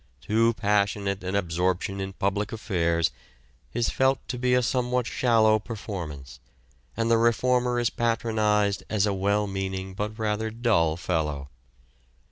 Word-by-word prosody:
Too 115 - +2
passionate 100 -2 0
an 95 +1 -2
absorption 90 +1 -1
in 95 0 -4
public 100 +2 -1
affairs 85 -6 0 0.6
is 120 0 0
felt 130 0 +2
to 125 - -3
be 125 0 +2
a 125 - +3
somewhat 125 0 0
shallow 115 -4 +3
performance, 85 - -7 0.6
and 115 0 +1
the 115 - +5
reformer 125 +1 +2
is 120 0 +1
patronized 110 -3 +1
as 105 -2 +2
a 105 - 0
well 100 +2 +1
meaning 95 -1 -4
but 105 +2 -4
rather 110 0 -1
dull 110 -9 +1
fellow. 75 -6 -2
105 Hz, 135 wpm, -26 LUFS, 95-115 Hz, 0.6 s, the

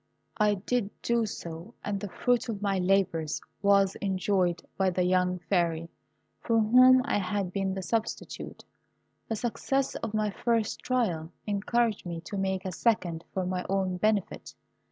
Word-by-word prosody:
I 210 -2 +3
did 205 +2 -1
do 235 -1 +1
so, 170 +3 -7
and 205 -1 -2
the 205 0 -5
fruit 245 +4 0
of 215 -3 -3
my 200 -2 0
labours 180 -4 +1 0.2
was 200 -1 +4
enjoyed 185 -2 +1
by 190 -1 +2
the 180 0 0
young 180 0 +2
Fairy, 170 -3 0 0.5
for 230 - +1
whom 255 +4 +7
I 280 - +1
had 195 -1 -2
been 195 -1 -1
the 190 - -4
substitute. 225 +3 -3 0.6
The 225 - 0
success 260 +4 -1
of 215 - -4
my 215 -1 +1
first 230 +1 0
trial 180 -11 -1
encouraged 210 0 0
me 170 -1 -4
to 200 - -7
make 190 -1 -1
a 185 - -2
second 175 -5 0
for 190 -1 -2
my 180 0 -2
own 190 -2 0
benefit. 210 0 -1
195 Hz, 155 wpm, -28 LUFS, 180-220 Hz, 0.6 s, whom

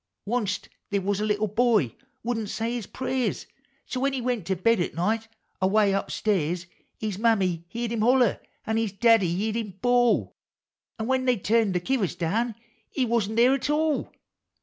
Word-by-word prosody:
Onc't 210 -4 -1 0.2
they 200 - +1
was 200 +1 -1
a - - +1
little 210 0 +1
boy 215 - +2 0.3
wouldn't 225 -3 -2
say 225 +2 -2
his 235 -5 -4
prayers, 260 -1 -2 0.2
— - - -40
So 255 - -4
when 275 +1 +1
he 270 - -1
went 240 -7 -2
to 190 - +1
bed 230 +5 +2
at 175 - -2
night, 220 +6 0 0.3
away 200 +1 +3
up 195 - -1
stairs. 175 -4 0 0.3
His 210 -3 -4
Mammy 190 -7 +2
heerd 235 +3 -4
him 230 -2 -1
holler, 245 -1 +4 0.3
an' 220 0 0
his 225 -3 -1
Daddy 225 -4 +4
heerd 215 +5 -1
him 210 -5 -5
bawl, 245 +1 +2 0.6
An' 220 - -3
when 260 +1 +1
they 250 -2 +3
tuin't 215 +1 +2
the 180 - +1
kivvers 205 0 -1
down, 220 +7 0 0.3
he 265 - 0
wasn't 220 -2 0
there 245 +3 +5
at 275 +1 -1
all 305 0 +1
220 Hz, 185 wpm, -26 LUFS, 195-245 Hz, 0.6 s, there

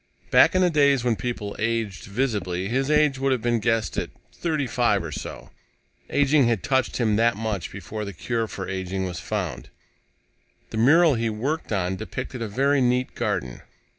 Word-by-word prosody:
Back - - +6
in 185 - +4
the 180 - +3
days 140 -4 +3
when 120 -2 +2
people 110 -3 -4
aged 110 -3 -2
visibly, 100 -5 -1
his 135 +5 0
age 150 -3 +3
would 135 0 +1
have 125 -4 0
been 120 -1 +2
guessed 115 0 0
at - - -4 0.2
thirty 155 -5 -1
five 115 -6 +1
or 80 - -6
so. - - -7 0.6
Aging 145 -2 +3
had 115 -5 0
touched 130 -1 +1
him 110 -4 +2
that 115 -1 +3
much 105 -5 -3
before 100 +3 -6
the 100 - -5
cure 115 +6 -2
for 95 -3 -6
aging 95 0 -3
was 90 -3 -5
found. - - -4 1.0
The - - -4
mural 155 +7 +5
he 115 -2 0
was 105 - -5
working 140 -4 -1
on 90 0 -1
depicted 125 +3 -6
a 115 - -2
very 135 +6 +2
neat 125 +1 +1
garden. 60 -1 -2
115 Hz, 185 wpm, -24 LUFS, 100-135 Hz, 1.0 s, Back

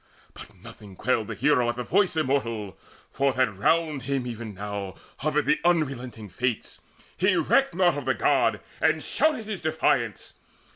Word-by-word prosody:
But - - -12
nothing 100 -3 -13
quailed 115 0 0
the 115 - -5
hero 125 +1 +2
at 120 - -2
the 125 - -4
voice 185 +2 +2
Immortal, 115 -9 -1 0.4
for 135 0 +1
that 125 -6 +1
round 155 - +1
him 135 0 -2
even 115 -3 -6
now 100 -1 -5 0.2
Hovered 150 0 0
the - - +2
unrelenting 130 -10 0
Fates. 120 +5 -3 0.3
He 190 +1 +2
recked 265 - +2
Naught 175 -5 +3
of 140 - -9
the 130 - +1
God, - - +2 0.2
and - - +2
shouted 300 -8 +1
his 210 -3 -4
defiance. 130 - 0
130 Hz, 160 wpm, -26 LUFS, 115-160 Hz, 0.4 s, Naught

